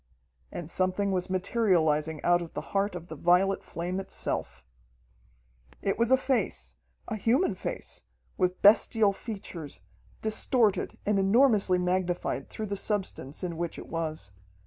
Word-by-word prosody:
And 170 - -6
something 185 +3 0
was 185 0 -1
materializing 170 -6 +1
out 175 0 +3
of 170 - -8
the - - -6
heart 200 -1 +1
of 170 -1 -7
the 160 - -8
violet 180 +5 +2
flame 180 +3 -4
itself. 65 - -3 1.2
It - - 0
was 235 0 +3
a 260 - +6
face 195 - -1 0.3
a - - -3
human 230 - +2
face, 185 - -6 0.3
with 180 0 -1
bestial 210 0 +5
features, 195 -9 -7 0.4
distorted 220 0 +2
and 205 -1 +2
enormously 200 -2 +4
magnified 180 -6 -1
through 220 - -5
the 200 -1 -3
substance 190 -8 -1
in 170 -3 -3
which 170 -1 -3
it - - -9
was. 155 - -3
185 Hz, 140 wpm, -28 LUFS, 170-210 Hz, 1.2 s, a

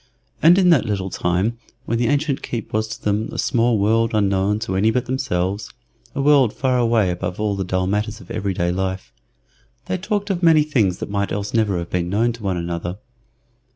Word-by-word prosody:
And 170 +3 +7
in 180 -2 +5
that 140 -10 +4
little 95 -3 -2
time, 95 +7 -1 0.3
when 115 +1 -1
the 120 - +1
ancient 145 0 0
keep 115 -3 -5
was 110 +1 0
to 110 - -8
them 105 +1 0
a - - -7
small 115 -1 +2
world 115 +2 +2
unknown 100 0 +1
to 110 -5 -3
any 100 +4 +3
but 125 +2 0
themselves 105 -6 -2 0.5
a 140 - -1
world 140 -6 +4
far 130 -2 0
away 115 -5 +2
above 90 +1 -4
all 105 -1 0
the 95 - -2
dull 95 0 -1
matters 105 +3 -2
of 90 - -13
every 100 -1 -2
day 85 0 0
life 95 +1 -3 0.7
they 185 - -2
talked 205 +1 -2
of 180 -2 -2
many 160 -3 +5
things 110 -12 +1
that - - -6
might 100 -1 -1
else 105 0 -3
never 110 -5 +1
have 85 0 -5
been 90 -1 -1
known 115 +5 +1
to 115 - -12
one 95 -3 -1
another. 85 +1 -4
105 Hz, 210 wpm, -21 LUFS, 95-120 Hz, 0.7 s, And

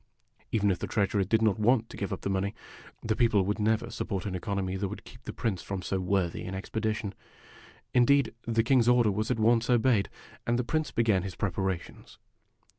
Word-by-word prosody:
Even 105 -2 +2
if 90 - -2
the - - -3
treasurer 100 -1 +1
did 110 +4 +1
not 110 0 +2
want 115 +1 +3
to - - -9
give 100 - -4
up 95 - -4
the - - -2
money, 95 +2 -1 0.5
the 110 -1 0
people 115 -5 +3
would 105 +3 -1
never 110 +2 +1
support 100 -5 -3
an 100 - -3
economy 95 +1 -2
that 100 +1 -1
would - - -8
keep - - -14
the - - -4
Prince 100 -5 -2
from 95 -2 -5
so 95 - -1
worthy 90 -2 0
an 95 - -5
expedition. 110 +1 -3 0.8
In 125 -1 +5
deed, 140 -1 +3
the 115 -1 +2
King's 125 -1 +3
order 120 -3 +4
was 110 +2 -2
at 125 - +1
once 115 +1 +3
obeyed, 120 -4 +3 0.4
and 120 0 +2
the 125 - 0
Prince 155 +5 -1
began 110 -5 +2
his 95 -2 -6
preparations. 95 -2 -3
105 Hz, 205 wpm, -29 LUFS, 95-115 Hz, 0.8 s, In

